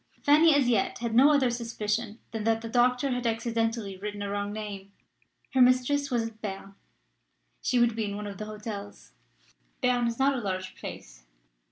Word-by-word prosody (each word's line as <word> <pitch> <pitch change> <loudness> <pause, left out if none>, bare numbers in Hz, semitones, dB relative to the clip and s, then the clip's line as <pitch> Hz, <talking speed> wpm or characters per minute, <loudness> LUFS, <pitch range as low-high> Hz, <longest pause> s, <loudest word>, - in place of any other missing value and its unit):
Fanny 305 +1 +6
as 280 -3 +3
yet 225 -5 +1
had 235 -1 -3
no 270 +6 +7
other 270 -4 +3
suspicion 225 -2 -3
than 225 -2 -4
that 225 0 +1
the 230 - -5
doctor 250 +3 +2
had 250 -1 -1
accidentally 225 -2 -1
written 205 +1 -5
a 200 - -3
wrong 205 0 -2
name. 205 -2 -7 0.6
Her 260 - +4
mistress 255 +3 +3
was 240 -3 0
at 220 -1 -14
Berne: 195 -1 -6 0.9
she 250 - +1
would 240 -2 +3
be 225 -1 -1
in 200 -1 -4
one 210 0 -5
of 200 -2 -7
the 215 - -4
hotels. 210 -1 -8 0.7
Berne 250 -2 +2
is 230 0 -3
not 275 +1 +3
a 255 - -2
large 185 -2 -3
place. - - -9
225 Hz, 185 wpm, -28 LUFS, 205-250 Hz, 0.9 s, no